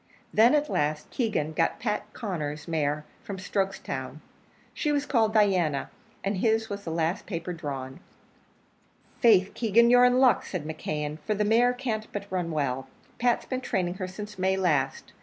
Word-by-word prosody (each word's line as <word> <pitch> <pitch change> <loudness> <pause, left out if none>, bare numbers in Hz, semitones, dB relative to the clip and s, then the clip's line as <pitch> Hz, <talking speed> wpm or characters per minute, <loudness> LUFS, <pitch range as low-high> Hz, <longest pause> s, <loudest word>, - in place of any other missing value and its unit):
Then, 230 +6 +6
at 300 0 +2
last, 150 - -1
Keegan 210 - -1
got 165 +1 0
Pat 210 -2 -2
Conner's 155 - -4
mare 150 -2 -1 0.2
from 200 - -6
Strokestown. 185 -8 -3 0.5
She 300 - -1
was 290 -1 +1
called 225 -6 +2
Diana, 185 -10 +2 0.3
and 200 0 -1
his 220 +2 +1
was 200 0 -5
the 165 - -5
last 165 +3 -1
paper 175 -2 -4
drawn. 135 -5 -6 1.2
"Faith, 200 -5 +5
Keegan, 235 +1 +4
you're 245 0 +7
in 250 0 +4
luck," 260 -1 +5
said 180 -6 -5
McKeon, 150 -1 -4
"for 210 +7 -2
the 210 +1 +1
mare 235 +3 +4
can't 230 -4 -3
but 205 -1 -4
run 180 -2 -1
well. 135 -4 -2 0.3
Pat's 240 0 +2
been 255 -1 -3
training 180 -7 -1
her 185 - -1
since 210 +2 -8
May 190 +1 +2
last. 150 -8 0
190 Hz, 165 wpm, -27 LUFS, 155-220 Hz, 1.2 s, you're